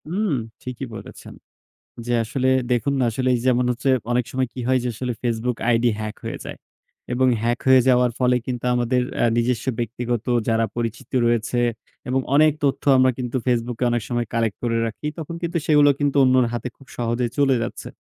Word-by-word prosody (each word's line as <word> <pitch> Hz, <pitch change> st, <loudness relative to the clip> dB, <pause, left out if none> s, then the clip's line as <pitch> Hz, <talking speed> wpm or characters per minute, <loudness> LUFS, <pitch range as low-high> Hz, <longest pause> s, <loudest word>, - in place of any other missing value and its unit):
উম, 200 Hz, +3 st, 0 dB, 0.3 s
ঠিকই 125 Hz, +1 st, -5 dB
বলেছেন। -, -, -10 dB, 0.7 s
যে, 120 Hz, -, -1 dB
আসলে 130 Hz, +4 st, -1 dB, 0.2 s
দেখুন 125 Hz, +3 st, +1 dB
না, -, -, +3 dB
আসলে 130 Hz, +3 st, -1 dB, 0.2 s
যেমন 125 Hz, -1 st, +3 dB
হচ্ছে 125 Hz, +3 st, -2 dB, 0.2 s
অনেক 120 Hz, 0 st, +1 dB
সময় 130 Hz, 0 st, 0 dB
কি -, -, -8 dB
হয় 130 Hz, 0 st, +3 dB
যে, 125 Hz, -, -1 dB
আসলে 125 Hz, +2 st, -3 dB
FaceBook 120 Hz, 0 st, -1 dB
আইডি 120 Hz, 0 st, +3 dB
হ্যাক 110 Hz, -1 st, -4 dB
হয়ে -, -, -4 dB
যায়। -, -, -7 dB, 0.6 s
এবং 130 Hz, +1 st, +2 dB
হ্যাক 120 Hz, +1 st, 0 dB
হয়ে 130 Hz, -1 st, +7 dB
যাওয়ার 125 Hz, -1 st, +4 dB
ফলে 125 Hz, -1 st, +3 dB
কিন্তু 125 Hz, -1 st, -3 dB
আমাদের 125 Hz, +1 st, +1 dB, 0.2 s
আ -, -, +5 dB
নিজস্ব 120 Hz, 0 st, 0 dB
ব্যক্তিগত 120 Hz, -1 st, -2 dB, 0.2 s
যারা 115 Hz, 0 st, +2 dB
পরিচিত 115 Hz, +1 st, -4 dB
রয়েছে 120 Hz, +1 st, +1 dB, 0.5 s
এবং 130 Hz, +1 st, +2 dB, 0.2 s
অনেক 155 Hz, +1 st, +6 dB
তথ্য 140 Hz, -2 st, +1 dB
আমরা 130 Hz, 0 st, +5 dB
কিন্তু 125 Hz, -1 st, -4 dB
FaceBook 120 Hz, -2 st, -1 dB
এ -, -, +3 dB
অনেক 120 Hz, 0 st, 0 dB
সময় 120 Hz, -1 st, -1 dB
কালেক্ট 115 Hz, -3 st, 0 dB
করে 115 Hz, -1 st, 0 dB
রাখি, 115 Hz, +7 st, -6 dB
তখন 165 Hz, +1 st, -6 dB
কিন্তু 170 Hz, 0 st, -1 dB
সেগুলো 150 Hz, -2 st, +5 dB
কিন্তু 145 Hz, -1 st, 0 dB
অন্যের 130 Hz, -1 st, +4 dB
হাতে 120 Hz, +1 st, -3 dB
খুব 135 Hz, -, -18 dB
সহজে 120 Hz, +1 st, 0 dB
চলে 140 Hz, -2 st, +4 dB
যাচ্ছে। 120 Hz, -, -6 dB
125 Hz, 185 wpm, -22 LUFS, 120-130 Hz, 0.7 s, হয়ে